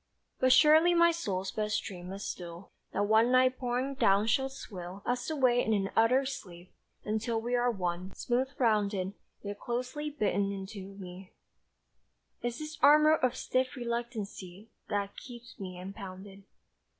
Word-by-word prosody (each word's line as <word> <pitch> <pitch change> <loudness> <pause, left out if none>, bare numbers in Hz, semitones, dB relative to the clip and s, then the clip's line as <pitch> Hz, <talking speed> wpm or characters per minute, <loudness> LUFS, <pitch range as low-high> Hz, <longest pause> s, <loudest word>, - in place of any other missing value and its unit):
But 255 0 +4
surely 315 +6 +6
my 340 0 +6
soul's 195 - -3
best 210 -1 -1
dream 180 -1 -7
is 195 +1 -6
still 175 +1 -7 0.2
That 200 - 0
one 220 +3 +4
night 255 0 +4
pouring 250 +2 -1
down 200 -5 +3
shall 265 +4 +1
swill 195 -7 -9
Us 245 +2 -1
away 255 -5 +3
in 220 - +1
an 195 -1 -1
utter 250 +4 +4
sleep, 180 -9 -8 0.3
until 220 +2 -1
We 240 +2 -3
are 245 0 +3
one, 180 -3 -3
smooth 250 +2 0
rounded. 205 -5 +1 0.3
Yet 205 0 -6
closely 255 +5 -3
bitten 200 -8 0
in 195 -1 -5
to 195 -2 -9
me 185 -1 -10 1.1
Is 240 0 -2
this 310 0 -7
armour 305 +2 +7
of 255 -4 0
stiff 255 +1 -1
reluctancy 225 -5 -5 0.2
That 200 -1 -2
keeps 240 -2 -11
me 185 -2 -7
impounded. 195 0 -9
220 Hz, 150 wpm, -30 LUFS, 195-255 Hz, 1.1 s, armour